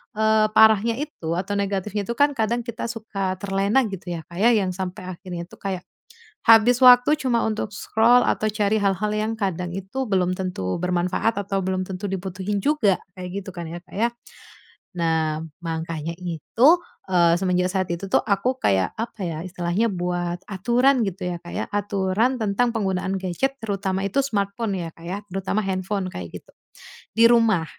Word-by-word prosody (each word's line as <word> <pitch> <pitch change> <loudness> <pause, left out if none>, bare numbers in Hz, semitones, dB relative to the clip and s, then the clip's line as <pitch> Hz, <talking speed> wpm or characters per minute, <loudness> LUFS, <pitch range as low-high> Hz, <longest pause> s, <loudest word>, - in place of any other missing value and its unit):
eee, 220 0 +3
parahnya 220 +1 +5
itu 290 - -5
atau 195 +3 -2
negatifnya 200 +1 -2
itu - - -2
kan 285 0 +4
kadang 230 +1 0
kita 235 -1 -5
suka 195 -4 -3
terlena 200 +6 +1
gitu 190 -3 -7
ya, 170 -2 -4
Kak, 170 - -13
ya, 235 +3 +5
yang 190 -4 +1
sampai 185 +1 -5
akhirnya 175 -1 -7
itu - - -14
kayak, 195 -2 -3 0.7
habis 225 +2 +7
waktu 250 +4 +7
cuma 250 -5 +1
untuk 215 -1 -3
scroll 230 +5 +4
atau 215 - +1
cari 210 0 +1
hal-hal 200 +1 0
yang 215 +1 -1
kadang 180 -5 -2
itu 195 +8 -4
belum 185 -3 +1
tentu 180 - -3
bermanfaat 180 +5 0
atau 195 0 -2
belum 185 0 -1
tentu 190 +1 -6
dibutuhin 190 +1 -3
juga. 215 -7 +2 0.2
Kayak 180 -1 -6
gitu 190 - -8
kan 170 - -4
ya 170 +2 -7
Kak, 175 - -18
ya. 230 +3 +2 0.9
Nah, 160 -2 +1 0.2
makanya 165 0 -4
itu, 180 - +1 0.4
eee, 175 -3 +4
semenjak 180 -1 +1
saat 190 -1 0
itu 190 +3 -5
tuh, - - +5
aku 220 +5 +1
kayak 95 -2 +2
apa 225 -2 -5
ya, 165 -3 -3
istilahnya 180 +3 -1
buat 175 0 -2
aturan 245 +7 +3
gitu 185 -1 -4
ya, 175 - -4
Kak, 175 - -10
ya, - - -1
aturan 205 +4 0
tentang 220 +3 +1
penggunaan 190 -2 -1
gadget, 190 +9 -1
terutama 195 -2 -1
itu 200 +7 0
smartphone 200 -2 -1
ya, 165 - -5
Kak, 165 +1 -15
ya. 185 +3 -3
Terutama 195 +3 -1
handphone, 190 0 -2
kayak 85 - -7
gitu, - - -24 0.7
di 230 - +7
rumah. 225 -8 +4
195 Hz, 175 wpm, -23 LUFS, 180-220 Hz, 0.9 s, habis